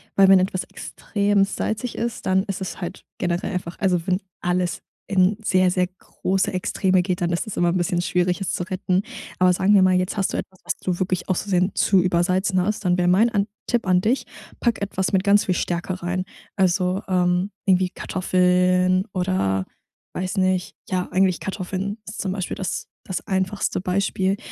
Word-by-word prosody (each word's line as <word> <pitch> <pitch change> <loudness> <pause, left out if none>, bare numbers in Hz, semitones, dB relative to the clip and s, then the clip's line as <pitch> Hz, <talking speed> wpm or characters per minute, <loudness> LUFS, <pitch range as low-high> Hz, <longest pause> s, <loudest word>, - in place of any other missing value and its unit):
weil 195 -1 +6
wenn 195 0 +8
etwas 185 0 -1
extrem 205 -1 0
salzig 220 +4 -3
ist, 235 0 -3
dann 190 0 +3
ist 195 -1 -5
es 190 - -5
halt 175 - -6
generell 175 +2 -1
einfach 180 -2 -5
also, 180 -4 +1
wenn 185 0 +1 0.2
alles 180 0 -1 0.3
in 190 +1 +3
sehr, 185 -2 +3
sehr 180 -1 +1
große 185 +1 -2
Extreme 185 0 +1
geht, 180 -1 -2
dann 170 - +1
ist 170 +6 -1
es 215 - -6
immer 175 0 +3
'n 175 - +1
bisschen 175 0 0
schwierig, 180 +1 0
es 195 - -1
zu - - -2
retten. 185 0 0 0.4
Aber 180 0 +5
sagen 190 +3 +3
wir 200 - +6
mal, 185 0 +4
jetzt 185 +3 -1
hast 195 - 0
du - - -1
etwas, 185 -1 -7
was - - -1
du 180 -1 -2
wirklich 185 0 -1
aus 185 - +1
versehen 185 -1 +1
zu 195 -2 +3
übersalzen 185 +1 +1
hast. 210 +1 -2
Dann 180 - +3
wär 175 - +2
mein 195 +7 +5
an 205 -1 +1 0.2
Tipp 235 -5 0
an 180 -1 +4
dich: 235 +7 +1 0.3
Pack 235 -4 0
etwas 190 -1 -2
mit 190 0 +3
ganz 205 0 +4
viel 185 - +1
Stärke 175 +1 -2
rein. 180 +1 -1 0.3
Also, 185 0 +2
ähm, 180 +1 +1 0.2
irgendwie 185 -1 +3
Kartoffeln 180 0 +2
oder, 140 - 0 0.5
weiß 185 +1 -3
nicht? 185 -1 +1
Ja, 185 -1 -1
eigentlich 185 -1 +2
Kartoffeln 195 +2 -4
ist 210 - -5
zum 190 -2 -2
Beispiel 190 -3 -3
das 190 - -3 0.2
das 185 - -5
einfachste 190 -1 -1
Beispiel, 190 +1 0
185 Hz, 190 wpm, -23 LUFS, 180-195 Hz, 0.5 s, wenn